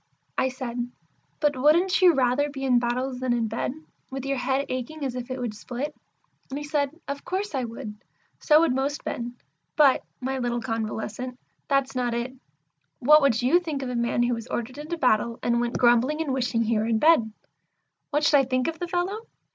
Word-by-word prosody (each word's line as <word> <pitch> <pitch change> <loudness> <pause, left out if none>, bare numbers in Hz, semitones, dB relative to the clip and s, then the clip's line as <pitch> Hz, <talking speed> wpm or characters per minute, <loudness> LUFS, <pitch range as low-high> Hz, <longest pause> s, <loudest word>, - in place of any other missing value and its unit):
I 260 - +1
said, 245 -2 -4 0.5
"But 295 -2 +2
wouldn't 335 +9 +3
you 355 -3 +7
rather 265 +3 +2
be 275 -1 -6
in 250 -2 +4
battles 250 +2 -2
than 255 -1 0
in 235 -2 0
bed, 225 +3 -2 0.4
with 270 0 -5
your 275 0 -1
head 265 +2 0
aching 265 +4 -4
as 260 - -2
if 250 0 -6
it 255 0 -4
would 240 -3 -3
split?" 255 +7 -5 0.5
And 270 - -4
he 295 - -4
said, 295 +1 -1
"Of 280 0 -4
course 385 0 -3
I 260 -3 -1
would; 230 -2 -7 0.4
so 305 0 +5
would 330 -6 +3
most 275 +3 -2
men. 240 0 -4 0.4
But, 285 -4 +5 0.2
my 265 +1 -2
little 240 -1 -1
convalescent, 225 +2 -4 0.3
that's 275 -1 +1
not 245 -2 0
it. 240 +2 -3 0.6
What 300 +4 +6
would 250 -4 +2
you 275 +8 +5
think 310 -6 -4
of 255 - -3
a 250 - -3
man 235 0 +1
who 240 0 +1
was 230 0 -5
ordered 255 +4 -4
into 315 +3 -4
battle, 235 -4 +2
and 235 0 +2
went 240 0 -1
grumbling 245 +5 +3
and 305 -5 -1
wishing 245 -3 0
he 225 -1 +1
were 220 - 0
in 230 -1 +2
bed?" 270 -5 +4 0.8
"What 295 0 0
should 295 -1 +5
I 270 - +2
think 255 0 0
of 330 0 -3
the 350 - -3
fellow? 375 +6 -2
260 Hz, 205 wpm, -26 LUFS, 240-290 Hz, 0.8 s, you